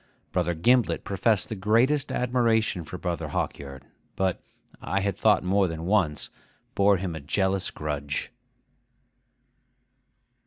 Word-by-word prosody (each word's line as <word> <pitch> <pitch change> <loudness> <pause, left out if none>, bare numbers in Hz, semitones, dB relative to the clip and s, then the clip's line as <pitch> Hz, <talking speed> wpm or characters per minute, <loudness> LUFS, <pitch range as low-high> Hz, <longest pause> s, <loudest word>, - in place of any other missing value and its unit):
Brother 85 -1 0
Gimblet 120 +9 +2
professed 100 +1 +1
the 110 - -3
greatest 115 +9 +2
admiration 115 -6 +1
for 90 - -8
Brother 85 -3 -3
Hawkyard, 70 -1 -4 0.3
but 95 -2 0 0.4
(I 100 - -1
had 100 -1 -1
thought 105 0 +3
more 95 +1 +2
than 80 -1 -5
once) 90 -7 0 0.4
bore 100 0 +4
him 90 -1 -4
a - - -5
jealous 95 +5 0
grudge. 75 +2 -4
95 Hz, 120 wpm, -26 LUFS, 85-110 Hz, 0.4 s, bore